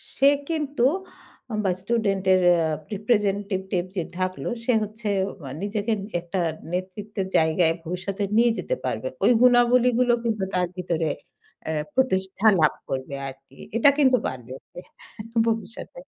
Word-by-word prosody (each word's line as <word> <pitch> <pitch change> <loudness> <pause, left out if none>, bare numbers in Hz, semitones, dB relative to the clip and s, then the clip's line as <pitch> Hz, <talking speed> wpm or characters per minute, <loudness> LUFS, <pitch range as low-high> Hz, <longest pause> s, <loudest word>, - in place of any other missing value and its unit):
সে 275 0 +5 0.2
কিন্তু 295 -6 0 0.7
আম 215 - -1
বা 185 - +3
স্টুডেন্টের 195 -4 +2
য়া 170 -2 +4 0.3
representative 200 -3 0
যে 175 - +1 0.2
থাকলো, 185 0 -2 0.2
সে 250 - +3
হচ্ছে 215 +1 -5 0.3
অয়া 135 -2 -7
নিজেকে 210 +2 -2
এ 195 - -6 0.2
একটা 175 +2 -4 0.3
নেতৃত্বের 190 +2 -4
জায়গায় 160 +1 +3
ভবিষ্যতে 190 +4 -4
নিয়ে 235 0 +5
যেতে - - -2
পারবে। - - -2 0.2
ওই - - +6
গুণাবলীগুলো 245 0 +5
কিন্তু 215 -4 -1
তার 180 -1 +1
ভিতরে 170 -3 -1 0.6
অ্যা 160 - -2 0.2
প্রতিষ্ঠা 195 -5 +1
লাভ 155 - +4 0.2
করবে 135 +1 -3
আরকি। 135 0 -12 0.2
এটা 235 - +6
কিন্তু 260 -3 +5
পারবে 125 0 -7 0.2
তে - - -8 0.7
ভবিষ্যতে। 225 - -4
200 Hz, 135 wpm, -24 LUFS, 180-235 Hz, 0.7 s, ওই